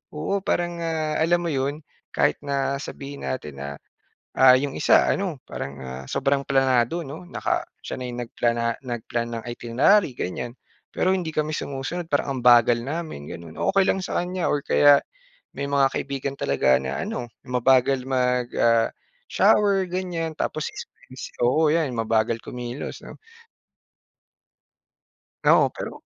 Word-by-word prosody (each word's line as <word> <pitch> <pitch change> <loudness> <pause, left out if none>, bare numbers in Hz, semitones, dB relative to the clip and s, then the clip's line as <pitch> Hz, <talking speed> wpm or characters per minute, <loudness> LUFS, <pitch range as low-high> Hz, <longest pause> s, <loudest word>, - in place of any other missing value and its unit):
oo 175 +7 -1
parang 175 -2 -1
nga 160 -2 -1
alam 175 +2 +3
mo 170 - -1
yun 140 +2 -1 0.4
kahit - - +2
na 140 -1 -1
sabihin 140 -1 -8
natin 75 - -5
na, 70 - -4 0.7
ah, 130 -1 +8
yung 140 -1 -3
isa - - +4
ano 180 -8 -1
parang 70 - -5
ah, 65 +1 -7
sobrang 140 0 +1
planado 135 +3 +2
'no, 150 +5 -8
naka - - -2 0.2
siya - - -5
na 125 - -4
yung 120 0 -6
nagplana 115 -1 0
nagplan 120 -1 -3
ng - - -11
itinerary 130 - +2
ganyan 120 +6 -4 0.4
pero 185 +1 +2
hindi 180 -4 -1
kami 155 0 0
sumusunod 155 +5 -4
parang 140 -2 0
ang - - -7
bagal 120 -1 +6
namin 150 - -5
ganun, 85 -2 -9 0.2
okey 195 -1 +3
lang 190 - +1
sa - - -1
kanya 180 0 -2
or 145 - +1
kaya 145 -1 +6 0.6
may 140 - -1
mga 140 -1 +3
kaibigan 140 0 -3
talaga 65 -1 +3
na 65 +1 -3
ano 125 - -4 0.2
mabagal 130 +1 +3
mag, 125 -2 +1
ah, 115 -1 +4 0.4
shower 200 -2 +3
ganyan 175 -3 -3
tapos 155 - -2 0.7
oo 150 +6 +3
yan 160 -4 +1
mabagal 115 0 +1
kumilos 125 +2 -6
'no. - - -10 2.3
Oo - - +6
pero - - -5
135 Hz, 145 wpm, -24 LUFS, 120-160 Hz, 2.3 s, ah